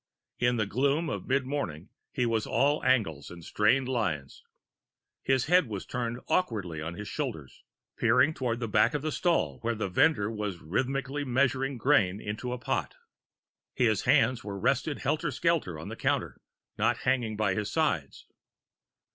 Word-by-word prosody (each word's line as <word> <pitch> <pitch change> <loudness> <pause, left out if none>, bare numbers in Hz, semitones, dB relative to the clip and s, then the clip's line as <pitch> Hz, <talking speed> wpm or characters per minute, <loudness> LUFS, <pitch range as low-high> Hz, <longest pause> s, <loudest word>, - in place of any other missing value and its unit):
In 120 0 +2
the 110 - +1
gloom 140 +9 0
of - - -5
mid 135 0 +1
morning, 105 - -4 0.2
he 125 - 0
was 115 -2 0
all 140 +5 +2
angles 100 - +1
and 85 -2 -11
strained 125 +5 +2
lines. 80 - -2 0.8
His 135 -2 +1
head 180 -2 +4
was 100 -4 -5
turned 120 0 -3
awkwardly 100 - -1
on 80 +2 -5
his 105 +3 -7
shoulder, 120 - -4 0.5
peering 125 +6 +4
toward 120 -5 -2
the 115 - -2
back 105 +6 +3
of 145 - -2
the 155 - -1
stall 170 +3 0
where 115 0 -1
the 105 -3 -2
vendor 110 - +2
was 105 -4 -3
rhythmically 135 - -2
measuring 130 0 +1
grain 105 -7 +3
into 110 +4 -4
a 125 - -2
pot. - - -2 0.8
His 110 -5 +2
hands 130 -3 +3
were 100 -1 -5
resting 140 +7 +1
helter 155 +1 -1
skelter 150 - 0
on 75 - -7
the - - -6
counter, - - -1 0.4
not - - +2
hanging 115 -5 +1
by 105 -3 +1
his 105 +1 -3
sides. 145 - -1
120 Hz, 165 wpm, -29 LUFS, 105-140 Hz, 0.8 s, head